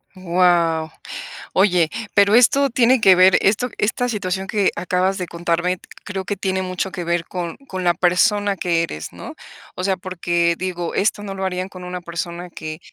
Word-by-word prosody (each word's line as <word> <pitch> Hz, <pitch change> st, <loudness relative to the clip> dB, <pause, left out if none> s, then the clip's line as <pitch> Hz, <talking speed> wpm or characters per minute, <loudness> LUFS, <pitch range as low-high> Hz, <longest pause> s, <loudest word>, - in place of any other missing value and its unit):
Guau. 170 Hz, -3 st, +2 dB, 0.6 s
Oye, 180 Hz, -4 st, +3 dB, 0.2 s
pero 200 Hz, +1 st, +5 dB
esto 275 Hz, +4 st, +5 dB
tiene 245 Hz, 0 st, +3 dB
que 190 Hz, -3 st, +7 dB
ver, 185 Hz, +1 st, +6 dB
esto 220 Hz, +5 st, +2 dB
esta 240 Hz, +4 st, 0 dB
situación 195 Hz, -4 st, -3 dB
que 200 Hz, -1 st, +1 dB
acabas 185 Hz, +2 st, 0 dB
de 180 Hz, -, -4 dB
contarme 170 Hz, +2 st, -1 dB, 0.3 s
creo 195 Hz, -2 st, -4 dB
que 205 Hz, +2 st, -4 dB
tiene 190 Hz, -1 st, -1 dB
mucho 185 Hz, +1 st, -3 dB
que 180 Hz, -1 st, -5 dB
ver 170 Hz, 0 st, -1 dB
con 175 Hz, -2 st, -5 dB
con 185 Hz, -1 st, -4 dB
la 175 Hz, -1 st, +3 dB
persona 200 Hz, +3 st, +2 dB
que 170 Hz, -3 st, 0 dB
eres, 80 Hz, -, -6 dB
¿no? -, -, -9 dB, 0.4 s
O 185 Hz, -, -4 dB
sea, 190 Hz, -1 st, +1 dB
porque, 175 Hz, -2 st, 0 dB
digo, 175 Hz, -2 st, -4 dB
esto 205 Hz, +1 st, +1 dB
no 195 Hz, -1 st, -6 dB
lo 190 Hz, -, -4 dB
harían 185 Hz, 0 st, -2 dB
con 185 Hz, -2 st, -11 dB
una 180 Hz, 0 st, -5 dB
persona 170 Hz, 0 st, -6 dB
que 155 Hz, -1 st, -7 dB
185 Hz, 180 wpm, -20 LUFS, 175-195 Hz, 0.6 s, que